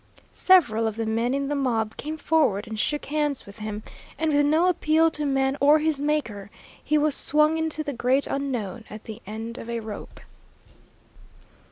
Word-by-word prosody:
Several 240 - +4
of 220 - -3
the 225 0 -2
men 230 +4 0
in 280 0 -1
the 290 - -1
mob 230 -6 -1
came 310 +2 -5
forward 295 -11 +1
and 220 -1 -6
shook 295 +6 -1
hands 295 -1 -1
with 200 +2 -13
him, 215 0 -5 0.3
and 315 -1 0
with 290 0 +3
no 320 +4 +3
appeal 325 -2 +3
to 300 -2 -2
man 270 0 +1
or 290 +2 +6
his 310 -2 +1
Maker, 270 -10 -2 0.3
he 305 - +2
was 300 0 +2
swung 305 +2 +2
into 320 -1 -1
the 290 -2 -4
great 255 +3 +1
Unknown 245 -6 -3
at 215 +1 -9
the 220 +1 -9
end 225 +3 -6
of 230 - -8
a 235 0 -2
rope. 215 -2 -8
275 Hz, 185 wpm, -25 LUFS, 225-305 Hz, 0.3 s, or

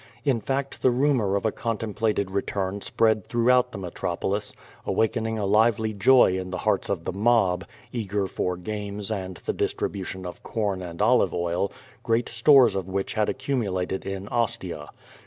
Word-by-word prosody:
In 130 -5 +2
fact 135 +4 -3
the 130 - +5
rumor 125 -6 +2
of 100 - -1
a 110 - +2
contemplated 110 -3 -1
re 100 +1 +1
turn 100 +1 -3
spread 110 -1 +2
throughout 125 +1 +3
the - - -7
metropolis, 95 +2 -3 0.3
awakening 110 0 0
a 105 - -1
lively 110 +2 +3
joy 105 -2 +5
in 95 0 -5
the 90 - -3
hearts 105 -1 0
of 95 -5 -2
the - - -2
mob, 100 -3 +2 0.3
eager 105 -4 -1
for 90 -1 -2
games 105 +2 -5
and 95 -4 -4
the - - 0
distribu 100 - -2
tion 95 0 -6
of 90 - -7
corn 100 -5 -2
and 85 -2 -3
olive - - +3
oil, 85 +3 -1 0.3
great 115 +1 0
stores 120 -2 +5
of 95 -1 -3
which 95 +1 -2
had 105 -1 +1
accumu 130 -5 -1
lated 95 0 -2
in 95 0 -5
Ostia. 105 -10 -2
105 Hz, 175 wpm, -25 LUFS, 95-115 Hz, 0.3 s, the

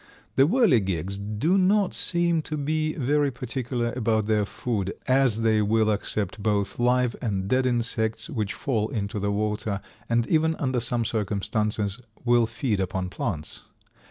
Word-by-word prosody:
The 135 - +5
Whirligigs 100 - +2 0.2
do 170 - +3
not 195 +1 +3
seem 170 -2 +1
to 155 - -2
be 155 +2 0
very 145 +1 +2
particular 125 -1 -3
about 110 -3 +1
their 105 -1 +2
food, 100 -3 -3
as 130 -4 +3
they 110 -1 +3
will 110 +1 +2
accept 105 -1 -2
both 100 -1 0
live 125 0 +2
and 100 -5 -1
dead 130 +3 +2
insects 115 -2 0
which 110 -9 -3
fall 110 -5 -1
into 105 -1 -3
the 100 +1 -1
water, 105 -1 -1 0.3
and 115 0 +2
even 160 +2 +2
under 130 -4 -1
some 120 0 -1
circumstances 105 0 -1 0.2
will 120 -1 +4
feed 115 -6 -1
upon 95 0 -2
plants. 75 -3 -4
115 Hz, 150 wpm, -25 LUFS, 105-130 Hz, 0.3 s, The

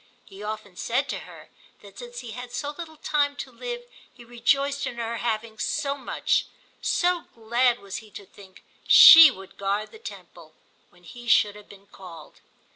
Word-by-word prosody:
He 195 +1 -14
often 210 -2 -7
said 265 +4 -1
to - - -3
her - - -14 0.3
that - - -14
since - - -9
he 235 - -9
had 245 +2 -9
so 290 +3 -4
little 315 -1 -9
time 290 -2 0
to - - -8
live 485 -1 -7 0.3
he 240 - -16
rejoiced 275 +4 0
in - - -6
her 235 0 -4
having 220 -1 -4
so 280 0 -2
much; 265 -3 -1 0.3
so 355 -1 0
glad 235 +2 +1
was 200 -4 -8
he 220 - -12
to 200 - -11
think 190 -1 -18 0.2
she 325 -1 +10
would 195 -7 -12
guard 200 +2 -2
the 440 - -14
temple - - -12 0.3
when 175 0 -25
he 240 +6 -12
should 210 -3 +3
have 210 -1 -15
been 200 0 -16
called. 175 -6 -14
235 Hz, 180 wpm, -25 LUFS, 205-285 Hz, 0.3 s, she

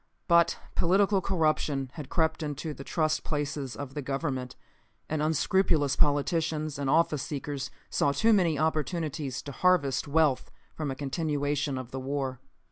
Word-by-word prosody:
But 170 -1 +4 0.2
political 195 +3 +3
corruption 155 -7 0
had 145 -3 -8
crept 160 -1 +1
into 150 +1 -4
the 135 - -9
trust 155 +1 0
places 145 -3 -3
of 140 -2 -7
the 145 - -3
government, 135 -2 -3 0.5
and 155 -1 -1
unscrupulous 155 -2 +2
politicians 155 0 +1
and 140 -1 -1
office 155 -2 +3
seekers 140 -1 -4 0.2
saw 140 - +2
too 220 +11 +3
many 170 -7 +3
opportunities 155 -3 -1
to 145 - -6
harvest 165 -5 +2
wealth 145 -2 +2 0.2
from 155 -2 -3
a 135 - -3
continuation 145 -1 -1
of 130 -1 -7
the 135 - -4
war. 135 -1 -3
150 Hz, 145 wpm, -28 LUFS, 140-160 Hz, 0.5 s, But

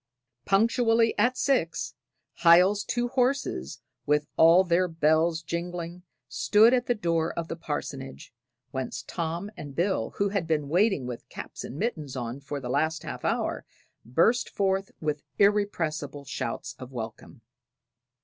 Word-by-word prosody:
Punctually 225 +2 +3
at 245 +4 +3
six, 170 - 0 0.4
Hiel's 180 +4 +5
two 240 0 -1
horses, 255 - -1 0.3
with 150 0 +2
all 165 +3 +7
their 180 0 +2
bells 160 0 +2
jingling, 170 +1 -4 0.3
stood 220 +4 +4
at 250 -1 +1
the 245 - +2
door 165 -5 0
of 165 -1 -3
the - - -3
parsonage, 140 -6 -6 0.4
whence 130 -2 -4
Tom 170 +4 -4
and 145 -6 -9
Bill, 175 - 0
who 200 0 +1
had 195 -5 -2
been 150 -3 0
waiting 185 - +2
with 125 -1 -7
caps - - -8
and 130 - -7
mittens 155 - -3
on 120 +1 -4
for 140 +1 -5
the 130 - -6
last 155 +5 0
half - - -6
hour, - - -1 0.4
burst 170 - +2
forth 195 -1 0
with 150 -2 -2 0.2
irrepressible 165 -9 +1
shouts - - -4
of 130 0 -9
welcome. 115 -3 -8
170 Hz, 140 wpm, -27 LUFS, 145-200 Hz, 0.4 s, all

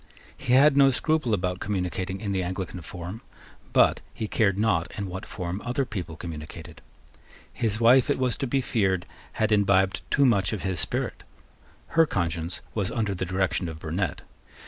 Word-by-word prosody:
He 125 - -1
had 140 +2 +6
no 140 -1 +7
scruple 150 -1 +1
about 90 -2 0
communicating 95 -1 -2
in 100 -3 -2
the 95 -1 0
Anglican 90 0 -4
form; 90 +7 -7 0.5
but - - +4
he 110 - -3
cared 100 -3 +2
not 100 -5 +1
in 100 - -2
what 95 +2 -6
form 90 +1 -4
other 125 +3 -1
people 90 -8 -5
communicated. 80 -1 -8 0.7
His 110 -1 -1
wife, 120 +2 +6
it - - +2
was 130 -2 +1
to 135 - -2
be 135 +2 +1
feared, 95 -7 0 0.3
had 110 0 0
imbibed 100 -2 +3
too 140 - +4
much 100 -5 +3
of 105 - -4
his 95 -3 -1
spirit. - - -2 0.7
Her 165 -1 +4
conscience 85 - -2
was 100 -4 -1
under 105 -4 -1
the 95 0 -3
direction 95 -1 0
of 80 - -7
Burnet. 85 +4 -3
95 Hz, 170 wpm, -26 LUFS, 90-115 Hz, 0.7 s, no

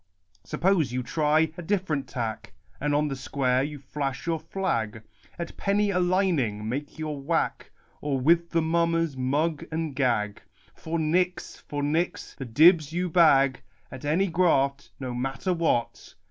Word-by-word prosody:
Suppose 180 -7 +1
you 125 0 -2
try 155 +3 +2
a - - -3
different 170 -6 -1
tack, 115 -4 -4 0.3
And 145 +1 0
on 150 +1 +2
the 140 - -3
square 130 -1 0
you 145 +2 -3
flash 135 -1 -4
your 165 -1 0
flag? 115 - -2 0.3
At 170 -1 -6
penny 205 +1 +1
a 180 - +1
lining 175 - +1
make 140 +5 -4
your 155 -3 -4
whack, 135 - -1 0.3
Or 140 -2 -1
with 170 +5 +3
the 165 -1 +1
mummers 165 -2 +1
mug 145 +5 0
and 160 -3 -3
gag? 115 -6 0 0.3
For 165 +1 -4
nix, 180 +3 0
for 145 -1 -5
nix 160 +5 -1
the 135 - -7
dibbs 155 +5 +5
you 180 +2 -1
bag 140 -6 +5 0.3
At 130 0 -9
any 160 +7 +2
graft, 140 -6 +1
no 130 -2 -4
matter 135 +9 -2
what 165 -8 -1
150 Hz, 155 wpm, -26 LUFS, 135-170 Hz, 0.3 s, dibbs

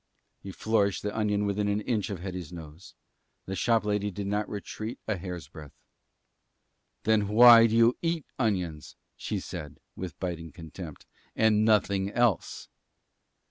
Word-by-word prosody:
He 100 - -7
flourished 100 -1 0
the 105 0 -3
onion 105 -1 0
within 100 +1 0
an 100 +1 0
inch 110 -2 -1
of 95 -4 -5
Hetty's 90 -4 -6
nose. 80 0 -11 0.5
The 95 - -4
shop 115 0 +2
lady 105 0 0
did 100 +1 -5
not 105 +1 -1
retreat 110 +2 -6
a 110 - 0
hair's 90 -4 -7
breadth. 75 -2 -12 1.3
"Then 110 -2 +2
why 115 +2 +8
do 115 - -1
you 115 +1 +5
eat 165 -3 -1
onions," 90 - -2 0.2
she - - -3
said, 75 -2 -8 0.2
with 90 -4 -7
biting 85 -3 -4
contempt, 80 -1 -10 0.3
"and 110 -1 +3
nothing 100 -3 +2
else?" 115 -4 0
100 Hz, 145 wpm, -28 LUFS, 90-110 Hz, 1.3 s, why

